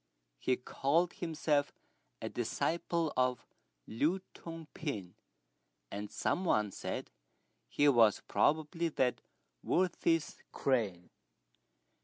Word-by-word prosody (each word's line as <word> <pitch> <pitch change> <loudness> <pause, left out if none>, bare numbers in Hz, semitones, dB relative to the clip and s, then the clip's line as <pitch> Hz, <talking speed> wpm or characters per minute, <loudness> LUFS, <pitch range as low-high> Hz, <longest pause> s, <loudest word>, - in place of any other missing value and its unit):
He 125 - +1
called 160 +7 +1
himself 155 -3 0 0.5
a - - -1
disciple 170 -1 -1
of 125 -1 +1 0.4
Lü 155 - +1
Tung 165 -1 -8
pin, 105 - -4 0.8
and 105 +1 -4
some 185 - 0
one 105 - +2
said - - -5 0.6
he 145 - +3
was 115 -6 +5
probably 160 +3 +2
that 125 -5 +1 0.4
worthy's 170 -3 +1
crane. 105 -10 0
145 Hz, 95 wpm, -34 LUFS, 120-165 Hz, 0.8 s, was